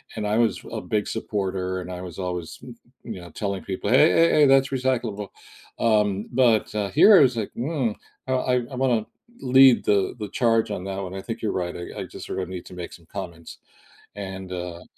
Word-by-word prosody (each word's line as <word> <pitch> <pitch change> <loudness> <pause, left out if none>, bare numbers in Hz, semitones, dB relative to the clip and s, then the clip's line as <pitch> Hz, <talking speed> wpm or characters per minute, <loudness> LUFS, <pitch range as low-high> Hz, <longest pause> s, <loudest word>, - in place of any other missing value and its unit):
and 105 - -3
I 105 +1 +1
was 115 -5 +2
a - - -4
big 105 -1 -1
supporter, 95 -4 -2
and 90 - -8
I 90 0 -6
was 90 -2 -8
always, 90 -3 -4
m 125 -2 -10 0.3
you 110 -6 -7
know, 85 - -11
telling 100 +2 -4
people, 95 - -4
"Hey, 150 +5 +6
hey, 165 0 +5
hey 150 - +5
that's 135 0 +4
recyclable," 125 -6 -1 0.5
um, 105 -3 +2
but, 120 -5 +3
uh, 105 -2 -1
here 205 - +7
I - - +7
was 130 -4 +3
like, 105 - -3
"Mm 130 -4 -1 0.3
I 130 - 0 0.4
I - - -6
wanna 125 -4 +1 0.3
lead 130 -1 +6
the 100 0 +2
the 105 - -4
charge 115 -1 +1
on 95 -3 -4
that 95 0 -4
one." 95 -1 -6
I 95 - -5
think 115 +3 -6
you're 110 - -1
right, 90 -1 -3
I 85 - -7
I - - -3
just - - -10
sort - - -4
of 90 -1 -4
need 90 -1 -7
to - - -12
make 90 -1 -7
some 85 - -15
comments. 85 -2 -8 0.6
And, 95 -2 -7
uh 90 -1 -6
105 Hz, 215 wpm, -24 LUFS, 95-120 Hz, 0.6 s, here